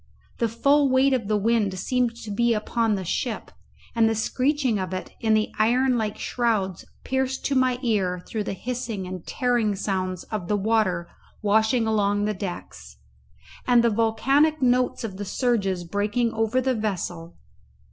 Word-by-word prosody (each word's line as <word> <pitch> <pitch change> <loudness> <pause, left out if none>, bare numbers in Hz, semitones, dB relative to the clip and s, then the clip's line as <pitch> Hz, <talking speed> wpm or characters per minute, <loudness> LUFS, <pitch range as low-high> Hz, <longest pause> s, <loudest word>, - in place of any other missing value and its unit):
The 230 - +1
full 280 +5 +3
weight 265 +1 +4
of 235 -6 -1
the 215 0 +2
wind 210 -2 +1
seemed 245 +4 0
to 215 - -6
be 235 +2 +2
upon 220 0 0
the 190 -2 -4
ship, 225 +6 -3 0.4
and 225 -1 +3
the 225 - 0
screeching 255 +1 0
of 185 0 -3
it 185 - -6
in 220 -1 +2
the 215 0 0
iron 250 +4 +3
like 215 -3 -2
shrouds 215 -7 -1 0.2
pierced 265 0 -1
to 275 - 0
my 255 -1 +2
ear 190 -6 0
through 215 -2 -3
the - - -3
hissing 230 -2 -4
and 180 -2 -6
tearing 240 -5 +1
sounds 185 -2 -2
of 210 -5 -3
the 210 - +1
water 200 -5 +1 0.4
washing 220 +3 +3
along 205 -2 +1
the 210 - 0
decks, 175 - -7 0.7
and 245 -1 +5
the 235 - +3
volcanic 270 +8 +2
notes 250 -2 +2
of 200 -4 -5
the 205 - -4
surges 200 -4 0
breaking 210 +6 -1
over 225 +3 +1
the 260 0 +1
vessel. 180 -6 -4
220 Hz, 165 wpm, -24 LUFS, 200-245 Hz, 0.7 s, and